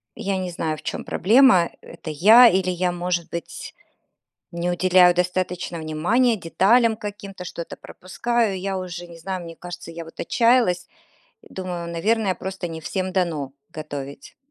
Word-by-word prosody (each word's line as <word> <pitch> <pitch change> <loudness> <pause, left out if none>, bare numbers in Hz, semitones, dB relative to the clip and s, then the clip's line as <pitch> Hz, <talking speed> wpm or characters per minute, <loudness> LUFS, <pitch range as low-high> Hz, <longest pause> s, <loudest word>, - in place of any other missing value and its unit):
Я 195 -1 -2
не 185 -1 -3
знаю, 160 -2 -2
в - - -12
чём - - -4
проблема, 215 -2 +4
это 160 - -10
я 215 +11 +8
или 185 0 +1
я, 180 0 0
может 175 -1 -2
быть, 170 -1 -7 0.8
не 170 +1 -2
уделяю 180 0 +5
достаточно 180 -1 -2
внимания 180 +11 +1
деталям 220 +6 +3
каким-то, 200 -3 -8
что-то 170 -1 -7
пропускаю. 225 +2 -2
Я 195 0 -3
уже 175 -1 -6
не 170 -1 -12
знаю, 185 +1 -5
мне 165 -1 -9
кажется, 175 -1 -8
я 165 0 -7
вот 165 - -15
отчаялась 230 -7 +2 0.6
и - - -17
думаю, 180 -2 -5
наверное, 205 +2 +1
просто 190 -2 -5
не 165 -1 -6
всем 185 +3 -3
дано 165 -7 -1 0.3
готовить. 145 -2 -8
180 Hz, 155 wpm, -23 LUFS, 170-195 Hz, 0.8 s, я